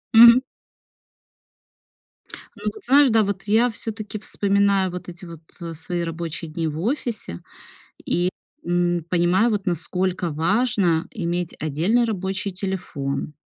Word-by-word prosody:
Мгм. 235 +2 +10 2.2
Ну, - - -13
вот 430 - -13
знаешь, 280 +1 +6
да, 220 -1 +4
вот 195 -1 -3
я 220 +4 +3
всё-таки 215 -1 -6
вспоминаю 200 -2 +1
вот 180 0 -7
эти 175 +1 -10
вот, 165 -2 -10 0.2
э, 165 -1 -5
свои 170 +2 -4
рабочие 165 0 -5
дни 165 +1 -2
в 155 0 -4
офисе 225 - -3 0.6
и, 175 +1 +1 0.3
м, 175 -1 +1
понимаю, 180 +6 +3
вот 205 -2 -2
насколько 180 0 -1
важно 180 0 +1
иметь 175 -6 -3
отдельный 165 - +1
рабочий 195 -2 -2
телефон, 180 -7 -4
185 Hz, 125 wpm, -23 LUFS, 170-215 Hz, 2.2 s, Мгм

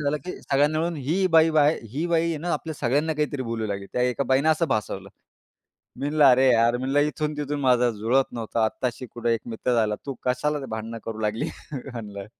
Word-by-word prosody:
झालं, 145 0 0
की 180 - -4
सगळ्यांनी 145 +3 +2
मिळून 170 0 -1
ही 160 +8 0
बाई, 160 0 +6
बाय 155 0 +3
ही 155 +5 -1
बाई 165 -1 +1
ना, 170 +3 -3
आपल्या 160 -1 -3
सगळ्यांना 145 +5 0
काहीतरी 150 -3 -1
बोलू 115 -2 -3
लागली. 100 -1 -4
त्या 125 - 0
एका 125 +2 0
बाईने 135 +4 +2
असं 160 +1 +2
भासवलं. 100 -2 -2 0.9
मी 140 - -2
म्हणलं 150 -1 +3
अरे, 130 0 +6
यार 115 0 +4
मी - - -6
म्हणलं, 135 +3 +1
इथून-तिथून 150 -1 -2
माझा 125 -2 +3
जुळत 115 +5 0
नव्हतं. 115 -1 -3
आत्ताशी 120 +3 -1
कुठे 120 0 -2
एक 115 - -3
मित्र 120 +2 -1
झाला. 110 -2 +2
तू 140 - -3
कशाला 140 +3 -1
भांडणं 110 0 -5
करू 110 -1 -5
लागली 105 +1 -1 0.3
म्हणलं? 115 -7 -7
130 Hz, 200 wpm, -25 LUFS, 115-150 Hz, 0.9 s, बाई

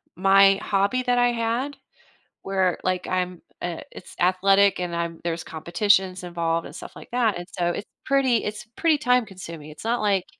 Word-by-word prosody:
my 195 +2 +6
hobby 200 +6 +1
that 245 -1 +1
I 245 0 +4
had, 235 +5 -1 0.7
where, 190 -2 +1
like, 185 -1 -1
I'm, 180 -1 -2 0.2
uh 175 -2 -3
it's - - -12
athletic, 195 +2 +4
and 175 -1 -3
I'm 170 -1 -3
there's 165 -1 -2
competitions 185 +3 +1
involved 170 -1 -1
and - - -12
stuff - - -9
like - - -12
that, 235 -5 +1
and 175 0 -7
so, 175 -1 +1
it's 200 +4 -4 0.2
pretty 265 -4 +2
it's 215 +1 -5
pretty 325 -3 +3
time 250 -4 +3
consuming, 170 -6 -9
it's 155 - -12
not 235 +2 0
like 200 -3 +1
195 Hz, 180 wpm, -24 LUFS, 175-225 Hz, 0.7 s, my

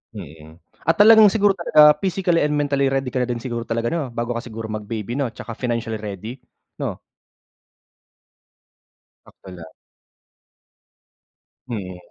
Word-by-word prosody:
Mm. 80 +2 -12 0.2
At 165 - +2
talagang 220 0 +8
siguro 205 -1 +3
talaga, 150 -4 +6
physically 180 -2 +1
and 150 - 0
mentally 140 -2 +1
ready 135 -1 -1
ka 125 - 0
na - - -3
din 120 -1 -2
siguro 120 -1 -4
talaga, 115 0 -2
'no, 150 -2 -2
bago 120 +1 -3
ka 120 - -4
siguro 115 -2 -7
mag 110 -1 -5
baby, 110 +1 -5
'no, 140 -3 -1
'tsaka 115 - -9
financially 115 -2 -3
ready, 105 +3 -7 0.4
'no? - - -4 2.3
Sakto - - -16
lang. 85 -2 -11 2.0
Mm. 95 -6 -5
120 Hz, 140 wpm, -21 LUFS, 110-150 Hz, 2.3 s, talagang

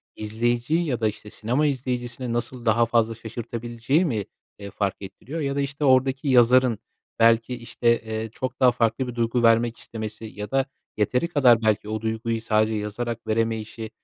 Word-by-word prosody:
izleyiciyi 120 +9 0
ya 125 -6 -1
da, 110 - +3
işte, 105 0 -6
sinema 125 +8 -1
izleyicisini 125 -3 -2
nasıl 120 +1 -4
daha 115 +1 +4
fazla 115 -1 +1
şaşırtabileceği 120 - -2
mi, 110 - -1 0.3
eee, 100 -1 -8
fark 100 -2 -1
ettiriyor? 130 +10 -7
Ya 140 -2 -1
da, 140 - +1
işte, 140 +1 -2
oradaki 130 +1 +3
yazarın 125 -2 +5 0.4
belki, 115 +1 +4
işte, 115 0 0
eee, 110 0 -4
çok 130 +1 -5
daha 125 -2 +6
farklı 120 +2 0
bir 125 - -6
duygu 120 +1 0
vermek 115 +1 +4
istemesi 110 0 -7
ya 105 -1 -7
da 135 0 +2 0.3
yeteri 125 +9 +1
kadar 130 -8 +4
belki 110 -1 +1
o 110 0 -3
duyguyu 115 0 -2
sadece 110 0 +2
yazarak 115 +3 -4
veremeyişi, 110 0 -2
115 Hz, 165 wpm, -24 LUFS, 110-125 Hz, 0.4 s, daha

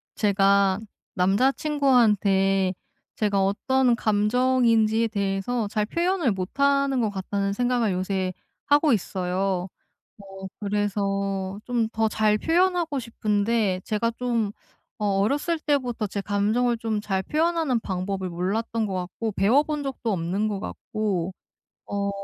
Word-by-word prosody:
제가 200 -1 +3 0.3
남자 195 +8 +3
친구한테 210 -10 +2 0.4
제가 200 -2 +1
어떤 250 +5 +2
감정인지에 225 +1 +2
대해서 200 +2 -1
'잘 210 0 0
표현을 340 - 0
못하는 275 +7 +1
것 220 - +1
같다.'는 200 0 -2
생각을 245 -1 +1
요새 185 0 -1 0.3
하고 290 -1 +4
있어요. 185 -2 -1 0.5
어 195 -1 -9
그래서 200 -1 -1
좀 235 -3 0
더 225 -1 0
잘 215 0 +2
표현하고 340 - +1
싶은데 215 -4 0
제가 225 +2 0
좀 235 -4 0 0.5
어 210 - -1
어렸을 290 - 0
때부터 250 -8 -1
제 200 +1 -4
감정을 215 +5 +1
좀 220 -2 -2
잘 195 -2 -1
표현하는 315 - +1
방법을 190 -1 -3
몰랐던 215 +6 -2
것 195 - -4
같고 185 +4 -4
배워 225 +10 +4
본 300 -1 -3
적도 260 -4 -3
없는 185 +4 -1
것 205 -2 -3
같고 195 -5 -3 0.5
어 200 0 -2
210 Hz, 255 characters per minute, -25 LUFS, 195-245 Hz, 0.5 s, 하고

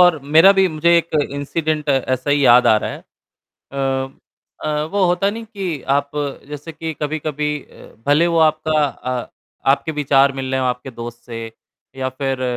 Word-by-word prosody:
और 175 -3 +6 0.2
मेरा 190 +5 +8
भी 190 - +5
मुझे 170 +1 +3
एक 165 -1 -4 0.2
इंसिडेंट 150 +2 -2
ऐसा 130 0 0
ही 145 -1 +3
याद 125 0 +7
आ 110 - +6
रहा - - -2
है। - - -7 0.7
अ 135 -1 -1 0.6
अ, 150 0 0
वो 200 -2 +2
होता 180 +3 +2
नहीं 225 +2 -7
कि 190 - -5
आप 140 0 +1 0.4
जैसे 150 +2 -7
कि 160 +1 -5
कभी-कभी 150 0 -2
अ, - - -16
भले 150 +4 +4
वो 170 -1 +1
आपका 155 -1 +1
अ, 125 -3 -5 0.4
आपके 140 +3 +1
विचार 140 -2 +3
मिल 135 -1 -4
रहे 130 0 0
हैं 130 - 0
आपके 125 +1 -4
दोस्त 120 -1 -8
से 115 -2 -6 0.5
या 130 0 -2
फिर 135 -2 -2
145 Hz, 175 wpm, -19 LUFS, 135-160 Hz, 0.7 s, मेरा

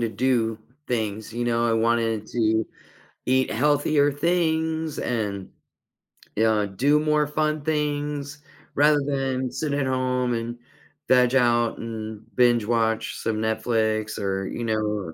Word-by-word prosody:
to 115 - 0
do 115 -1 0 0.3
things, 110 -2 -2
you 120 +1 -2
know, 120 0 +1
I 115 - +2
wanted 115 -1 +1
to 110 -2 +1 0.6
eat 130 +1 +2
healthier 145 +2 +2
things, 160 0 0
and, 105 -5 -2 0.9
you 110 - +2
know, 110 -2 +3
do 140 +10 +2
more 150 -1 +2
fun 155 +1 -1
things 145 -1 -2 0.4
rather 150 +1 +4
than 135 -2 -1
sit 150 -2 -3
at 145 -1 0
home, 125 -1 0
and 115 +1 -4 0.5
veg 125 0 +4
out, 120 -2 +2
and 110 -1 -6
binge-watch 115 -2 +2
some 110 -1 -2
Netflix, 110 -1 0
or, 95 -1 -2
you 120 - -5
know, 105 -5 -2
120 Hz, 130 wpm, -24 LUFS, 110-145 Hz, 0.9 s, rather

